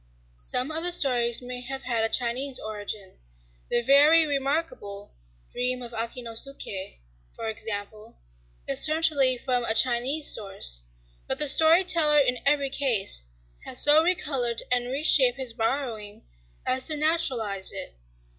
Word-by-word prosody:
Some 250 Hz, -, -2 dB
of 320 Hz, +1 st, -4 dB
the 355 Hz, -, +2 dB
stories 245 Hz, -7 st, +2 dB
may 250 Hz, 0 st, -7 dB
have 265 Hz, +2 st, -8 dB
had 235 Hz, -3 st, -2 dB
a 225 Hz, -, 0 dB
Chinese 255 Hz, +3 st, -1 dB
origin: 205 Hz, -2 st, -8 dB, 0.5 s
the 240 Hz, -, 0 dB
very 295 Hz, +5 st, +5 dB
remarkable 275 Hz, -8 st, -4 dB, 0.4 s
"Dream 250 Hz, 0 st, -3 dB
of 240 Hz, -, -9 dB
Akinosuké," 230 Hz, -, -6 dB, 0.4 s
for 225 Hz, -, -7 dB
example, 215 Hz, 0 st, -6 dB, 0.5 s
is -, -, 0 dB
certainly 305 Hz, -5 st, +2 dB
from 250 Hz, -1 st, -2 dB
a 225 Hz, -1 st, +1 dB
Chinese 260 Hz, +5 st, +1 dB
source. 195 Hz, -, 0 dB, 0.5 s
But -, -, -2 dB
the -, -, +5 dB
story 320 Hz, +5 st, +6 dB
teller, 310 Hz, -4 st, +3 dB
in 250 Hz, -4 st, +2 dB
every 280 Hz, -1 st, +1 dB
case, 230 Hz, -, +2 dB, 0.4 s
has 250 Hz, -, -1 dB
so 295 Hz, +2 st, +7 dB
recolored 275 Hz, -9 st, -1 dB
and 245 Hz, -1 st, 0 dB
reshaped 265 Hz, -2 st, +2 dB
his 260 Hz, -3 st, -5 dB
borrowing 225 Hz, -3 st, -4 dB, 0.4 s
as 260 Hz, 0 st, -1 dB
to 310 Hz, -2 st, -2 dB
naturalize 250 Hz, -, +1 dB
it... -, -, -8 dB
250 Hz, 135 wpm, -24 LUFS, 225-285 Hz, 0.5 s, so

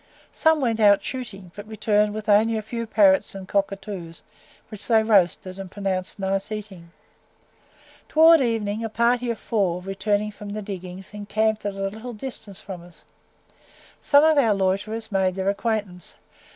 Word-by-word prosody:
Some 320 Hz, -1 st, +3 dB
went 230 Hz, -3 st, 0 dB
out 205 Hz, -2 st, +5 dB
shooting, 200 Hz, -9 st, -7 dB
but 205 Hz, +1 st, -9 dB
returned 210 Hz, -1 st, +1 dB
with 215 Hz, 0 st, -6 dB
only 220 Hz, +2 st, +4 dB
a 215 Hz, -, -4 dB
few 230 Hz, +1 st, -5 dB
parrots 195 Hz, -3 st, +3 dB
and 190 Hz, -1 st, -8 dB
cockatoos, 195 Hz, -4 st, -3 dB, 0.5 s
which 215 Hz, -2 st, -9 dB
they 225 Hz, -2 st, +4 dB
roasted, 190 Hz, -3 st, +2 dB
and 195 Hz, -1 st, -7 dB
pronounced 190 Hz, -2 st, -3 dB
nice 195 Hz, +1 st, -2 dB
eating. 200 Hz, -5 st, -7 dB, 1.2 s
Towards 320 Hz, 0 st, +6 dB
evening, 225 Hz, -3 st, -1 dB
a 225 Hz, -, -3 dB
party 240 Hz, +2 st, +1 dB
of 230 Hz, -, -2 dB
four, 190 Hz, -6 st, -1 dB
returning 205 Hz, +3 st, -1 dB
from 205 Hz, 0 st, -10 dB
the 215 Hz, 0 st, -5 dB
diggings, 190 Hz, -1 st, -8 dB
encamped 210 Hz, +1 st, -1 dB
at 200 Hz, -, -4 dB
a 195 Hz, -, -4 dB
little 220 Hz, +5 st, -7 dB
distance 215 Hz, -4 st, -7 dB
from 190 Hz, -4 st, -8 dB
us. 175 Hz, -1 st, -17 dB, 1.0 s
Some 285 Hz, 0 st, +5 dB
of 315 Hz, -2 st, +5 dB
our 225 Hz, -6 st, +3 dB
loiterers 205 Hz, +4 st, -2 dB
made 190 Hz, -2 st, +1 dB
their 190 Hz, 0 st, -1 dB
acquaintance. 200 Hz, -4 st, -3 dB
205 Hz, 160 wpm, -23 LUFS, 195-220 Hz, 1.2 s, Towards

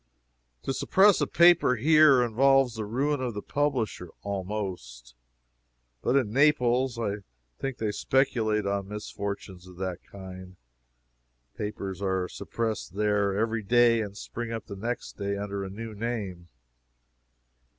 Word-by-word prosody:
To -, -, -1 dB
suppress 195 Hz, +8 st, +4 dB
a -, -, +2 dB
paper 170 Hz, -6 st, +5 dB
here 150 Hz, 0 st, +6 dB
involves 135 Hz, +2 st, +3 dB
the 110 Hz, -2 st, -4 dB
ruin 135 Hz, +6 st, 0 dB
of 120 Hz, -4 st, -3 dB
the 105 Hz, -, -5 dB
publisher, 130 Hz, -, -1 dB
almost. 95 Hz, -, -5 dB, 0.9 s
But 125 Hz, -, +1 dB
in 120 Hz, -6 st, +1 dB
Naples 130 Hz, -3 st, +3 dB
I 105 Hz, -3 st, -2 dB, 0.4 s
think 135 Hz, -2 st, -3 dB
they 110 Hz, -2 st, -1 dB
speculate 110 Hz, -4 st, +1 dB
on 100 Hz, -1 st, -1 dB
misfortunes 100 Hz, -3 st, -6 dB
of 90 Hz, -1 st, -14 dB
that 95 Hz, -1 st, -4 dB
kind. 95 Hz, -1 st, -10 dB, 1.0 s
Papers 100 Hz, -2 st, -5 dB
are 95 Hz, -2 st, 0 dB
suppressed 110 Hz, -4 st, -4 dB
there 105 Hz, -1 st, +1 dB
every 115 Hz, +1 st, 0 dB
day, 115 Hz, +2 st, +4 dB
and 100 Hz, -2 st, -6 dB
spring 120 Hz, +1 st, -6 dB
up 115 Hz, -2 st, -5 dB
the 100 Hz, -, -8 dB
next 115 Hz, +5 st, -5 dB
day 100 Hz, 0 st, -2 dB
under 100 Hz, -1 st, -4 dB
a 95 Hz, -, -5 dB
new 110 Hz, +3 st, -7 dB
name. 100 Hz, -6 st, -4 dB
105 Hz, 135 wpm, -27 LUFS, 100-125 Hz, 1.0 s, here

